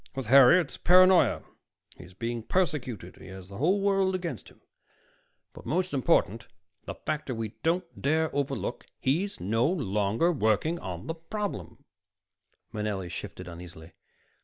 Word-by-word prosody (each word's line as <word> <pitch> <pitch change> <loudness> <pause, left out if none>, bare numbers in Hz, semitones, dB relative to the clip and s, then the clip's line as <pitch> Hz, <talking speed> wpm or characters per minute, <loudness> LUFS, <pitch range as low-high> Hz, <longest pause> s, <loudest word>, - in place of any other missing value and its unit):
With 135 -2 -4
Harry, 135 +7 +7
it's 175 - -4
paranoia. 185 0 +5 0.5
He's 90 +1 -14
being 115 +3 -3
persecuted; 125 - -2
he - - -13
has 95 0 -10
the 100 - -9
whole 185 +8 +2
world 195 -1 +2
against 175 -2 -5
him, - - -22 0.9
but - - -12
most 180 +7 -1
important 125 - +1 0.4
the - - -6
factor 150 -4 -4
we 110 -1 -3
don't 170 +3 +1 0.2
dare 160 +3 +1
overlook 140 -3 -3
he's 185 +10 -1
no 115 +6 +1
longer 115 - +1
working 140 - +1
on 90 - -6
the 165 - -3
problem." 165 - -6 0.9
Manelli 105 -4 -3
shifted - - -7
uneasily. 85 -1 -11
135 Hz, 135 wpm, -28 LUFS, 105-175 Hz, 0.9 s, Harry